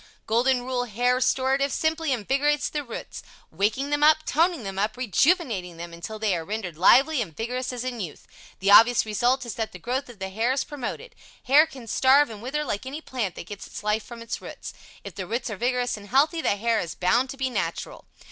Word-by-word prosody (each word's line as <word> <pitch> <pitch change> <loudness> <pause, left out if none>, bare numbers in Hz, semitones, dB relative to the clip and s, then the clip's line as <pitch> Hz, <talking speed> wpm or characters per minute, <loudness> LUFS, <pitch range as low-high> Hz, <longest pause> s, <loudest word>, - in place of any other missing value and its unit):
Golden 245 +3 +2
Rule 250 -1 -1
Hair 245 +3 +1
Restorative 265 +2 +1
simply 315 -1 0
invigorates 275 +5 +1
the 295 -1 -3
roots 235 -4 -8 0.3
waking 225 +8 -1
them 290 0 +1
up 310 +1 +5
toning 330 -3 +1
them 195 -1 -5
up 215 +2 -1
rejuvenating 235 - +1
them 170 0 -8
until 170 +6 -7
they 215 -3 0
are 165 - -3
rendered 190 -2 -5
lively 265 - +5
and 165 -9 -6
vigorous 250 +3 -3
as 250 -1 -5
in 250 -2 -4
youth, 175 -7 -7 0.4
The 200 +1 +3
obvious 230 +3 +7
result 245 +4 +1
is 235 - -5
that 220 0 -4
the - - -7
growth 250 +9 -3
of 240 - -12
the 190 0 -5
hair 225 +6 0
is 275 - 0
promoted. 295 - -6 0.3
Hair 295 +5 +6
can 265 -6 -11
starve 265 +4 +4
and 210 -2 -9
wither 300 +5 -2
like 205 +2 -3
any 280 +4 -5
plant 240 - -4
that - - -8
gets 200 +2 -9
its - - -9
life 210 +1 0
from 235 -1 -10
its 230 - -5
roots. - - -8 0.3
If 200 - -8
the 185 +1 -6
roots 235 +2 -3
are - - -3
vigorous 245 +3 0
and 205 -1 -12
healthy, 295 - +2
the 200 - +1
hair 225 +2 +1
is 170 - -4
bound 240 +8 +2
to 275 - -7
be 265 -1 -1
natural. - - -4
245 Hz, 220 wpm, -25 LUFS, 210-270 Hz, 0.4 s, obvious